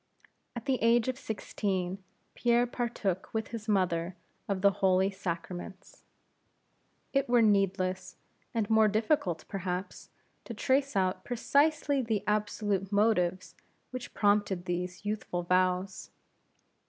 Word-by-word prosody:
At 240 - -6
the 265 -3 0
age 230 +1 +4
of 255 0 -3
sixteen, 195 -3 -3 0.3
Pierre 240 0 +3
partook 235 -7 -2
with 220 - -1
his 225 -2 -7
mother 180 -3 +1 0.3
of 195 -1 -1
the 200 - +6
Holy 190 0 +3
Sacraments. 185 +1 -6 1.1
It 275 -2 +1
were 240 -1 +5
needless, 195 -3 +1 0.4
and 225 -4 -1
more 220 0 +5
difficult, 215 - 0
perhaps, 185 -1 -4 0.4
to 230 - -7
trace 270 +4 +1
out 185 -1 +1
precisely 285 +3 +2
the 225 -4 -1
absolute 205 -2 -1
motives 185 -4 +1 0.4
which 255 -1 -7
prompted 205 -3 +2
these 180 +2 -4
youthful 205 -4 -2
vows. 185 +1 0
200 Hz, 115 wpm, -30 LUFS, 185-230 Hz, 1.1 s, the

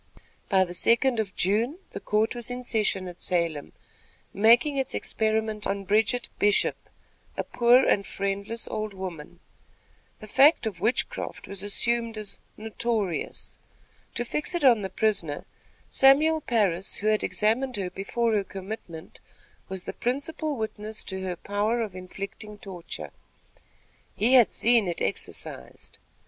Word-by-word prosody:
By 190 -2 +5
the 175 -1 -6
second 235 +6 +3
of 200 -4 -3
June, 225 - +1
the - - -6
court 215 +2 +1
was 240 -1 -6
in 250 0 -5
session 210 -5 0
at 175 -1 -10
Salem, 170 -5 0 0.6
making 240 +8 +4
its 270 -1 -1
experiment 220 -1 -1
on 200 0 -2
Bridget 215 +5 +2
Bishop, 205 0 +2 0.5
a - - 0
poor 245 +2 +4
and 200 - +3
friendless 200 +4 -3
old 215 -2 -4
woman. 180 -5 -8 0.8
The 215 - -11
fact 270 +6 +5
of 200 -6 -4
witchcraft 250 - -1
was 200 -1 -6
assumed 230 +2 0
as 210 -2 -6 0.2
"notorious." 220 -4 -3 0.6
To 240 - -1
fix 300 +8 -2
it 345 - -1
on 240 -5 +6
the 190 - -3
prisoner, 190 -7 -1 0.5
Samuel 305 +4 +5
Parris, 200 - +1
who 205 - -5
had 215 0 +2
examined 235 +5 0
her 185 -2 -3
before 225 +5 -1
her 205 -2 +2
commitment, 190 -4 -8 0.5
was 190 -1 -5
the - - -5
principal 285 +4 -2
witness 215 -1 -4
to 190 -1 -4
her 185 -1 -3
power 205 +6 -1
of 215 -5 -3
inflicting 195 +3 -7
torture. 185 -4 -7 1.0
He 240 +4 +3
had 245 -4 +7
seen 230 -3 +3
it 175 - -3
exercised. 80 -8 -3
215 Hz, 140 wpm, -26 LUFS, 195-235 Hz, 1.0 s, had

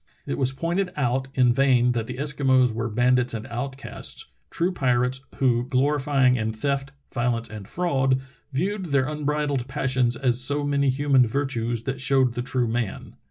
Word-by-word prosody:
It 70 - -3
was 130 - +2
pointed 175 +7 -1
out 130 -1 0
in 125 -2 +4
vain 125 -2 +3
that 115 -2 -2
the 125 - -5
Eskimos 135 -4 +2
were 115 +1 -2
bandits 125 +2 +2
and 110 0 -5
outcasts 130 +2 -4
— - - -45
true 175 +3 0
pirates 130 -4 0
who, 125 -3 +1
glorying 135 -1 +2
in 110 -1 -2
theft, 135 +4 -2 0.2
violence, 120 -2 0
and 105 -2 -8
fraud, 135 -4 +1 0.3
viewed 190 +8 -1
their 140 -3 +1
unbridled 150 -3 -1
passions 130 -3 0
as 125 -2 +2
so 145 +3 0
many 140 -1 +1
human 135 -2 +3
virtues 120 -3 -2
that 135 0 -4
showed 130 -2 +2
the 120 - -3
true 125 -1 -1
man 115 -2 -1
(Inuit). - - -14
130 Hz, 170 wpm, -24 LUFS, 120-140 Hz, 0.3 s, in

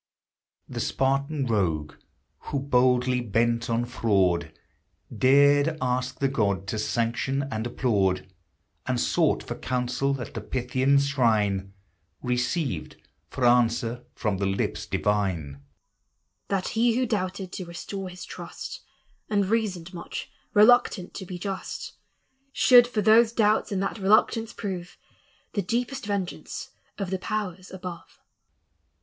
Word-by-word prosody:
The - - -6
Spartan 140 +2 0
rogue 85 -10 0 0.5
who, 140 - -2
boldly 125 -2 +2
bent 115 +1 0
on 115 +1 +1
fraud, 95 -9 +1 0.6
Dared 145 +3 +4
ask 125 0 -1
the 140 - +1
god 100 -7 0
to 110 - -2
sanction 120 +5 -1
and 110 0 -2
applaud, 100 -7 +1 0.6
And - - 0
sought - - +2
for - - -5
counsel 130 +2 -1
at 120 - -7
the 115 - -4
Pythian 130 +4 +1
shrine, 110 -8 +1 0.5
Received 125 - -1 0.3
for 130 - -1
answer 120 0 +2
from 105 -4 -1
the 100 - +1
lips 95 0 -2
divine, 90 -9 -1 0.3
— - - -50
" - - -50
That 195 -2 -1
he 230 0 +2
who 255 +1 +2
doubted 190 -4 -2
to 185 - -5
restore 185 +3 -6
his 180 0 -9
trust. - - -8 0.5
And 205 -2 +2
reasoned 190 -6 -1
much, 170 - -6 0.2
reluctant 210 -4 +5
to 190 - -7
be 180 - -5
just, 190 +1 -5 0.6
Should 245 -3 +7
for 220 -4 -1
those 225 +2 +6
doubts 215 -2 +2
and 195 -1 0
that 205 - -3
reluctance 215 +3 +3
prove 180 -4 -6 0.6
The 205 - 0
deepest 245 +4 -2
vengeance 200 -3 -4 0.3
of 195 -3 -4
the 190 - -1
powers 190 -3 -4
above." 180 -2 -8
140 Hz, 130 wpm, -26 LUFS, 115-190 Hz, 0.6 s, Should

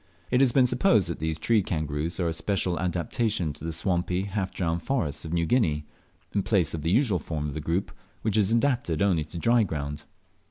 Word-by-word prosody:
It 125 +1 +4
has 135 -3 +5
been 130 +1 +5
supposed 120 - +3
that 85 - -4
these 80 0 -2
tree 110 +6 +2
kangaroos 80 -1 -2
are 85 - +1
a 80 - 0
special 90 -1 -1
adaptation 90 0 -1
to 75 - -13
the 80 - -2
swampy, 90 +2 0
half 100 -1 -3
drowned 85 -2 -1
forests 85 - -1
of, 80 - -6
New 85 -1 +1
Guinea, 80 -9 +1 0.5
in 100 - +2
place 95 -6 +1
of 80 - -3
the 80 - -1
usual 105 -2 +3
form 75 -1 -4
of 70 - -5
the 80 - -4
group, 85 +5 -1 0.3
which 105 -2 +1
is 105 -1 +3
adapted 115 - +1
only 90 -6 +2
to 85 - -9
dry 115 +7 +3
ground. 75 -6 -3
90 Hz, 210 wpm, -27 LUFS, 80-105 Hz, 0.5 s, has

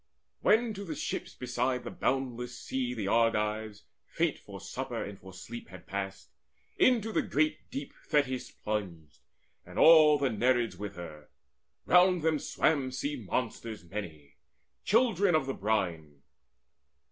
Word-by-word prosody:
When 225 +1 +3
to 200 0 -6
the 165 -5 -5
ships - - -4
beside 125 0 -1
the - - -6
boundless 125 -2 -2
sea 125 -2 -3
The 105 -4 -3
Argives, 105 -1 +1 0.2
faint - - -1
for - - -10
supper - - -4
and 100 -1 -8
for 95 - -12
sleep, 115 +6 -9
Had 95 -1 -12
passed, 95 0 -5 0.5
into 225 -3 +4
the - - +2
great 155 +2 0
deep 140 +1 -6
Thetis 135 -4 +1
plunged, 90 -8 -5 0.4
And - - -12
all 155 -2 +8
the 140 -3 0
Nereids 120 +2 +1
with 100 -1 -6
her. 80 -4 -9 0.6
Round 180 -1 +5
them 160 -2 +2
swam 140 -4 +1
Sea 135 0 -3
monsters 115 -3 -3
many, 80 -7 -8 0.5
children 205 -5 +3
of 155 - +2
the 135 - -2
brine. 85 - -2
120 Hz, 140 wpm, -30 LUFS, 100-150 Hz, 0.6 s, all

